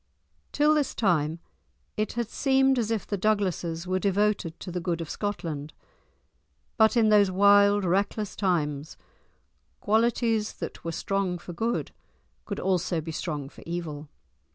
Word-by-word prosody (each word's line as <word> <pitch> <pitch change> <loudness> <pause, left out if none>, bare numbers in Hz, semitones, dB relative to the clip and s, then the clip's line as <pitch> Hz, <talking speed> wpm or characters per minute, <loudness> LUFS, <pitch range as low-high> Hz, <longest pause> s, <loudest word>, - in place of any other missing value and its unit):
Till 300 +1 +3
this 295 -3 0
time 165 -6 +1 0.6
it 215 0 -2
had 235 -1 -2
seemed 265 +1 +2
as 225 -2 -1
if 225 -3 -1
the 205 - -3
Douglases 185 -5 0
were 185 +1 0
devoted 200 -3 0
to 180 - -7
the 180 - -2
good 170 -1 -2
of 165 -3 -5
Scotland. 165 -8 -4 1.0
But 220 0 +4
in 220 -2 +4
those 205 -2 +5
wild, 200 +1 +5
reckless 200 +3 0
times 155 -6 -1 0.8
qualities 225 0 +1
that - - -7
were 165 - -3
strong 190 +1 -1
for 175 0 -9
good 225 +7 -2 0.5
could 200 - -4
also 180 -2 0
be 160 +1 -5
strong 150 -3 -4
for - - -15
evil. 160 -4 -5
195 Hz, 145 wpm, -27 LUFS, 170-215 Hz, 1.0 s, those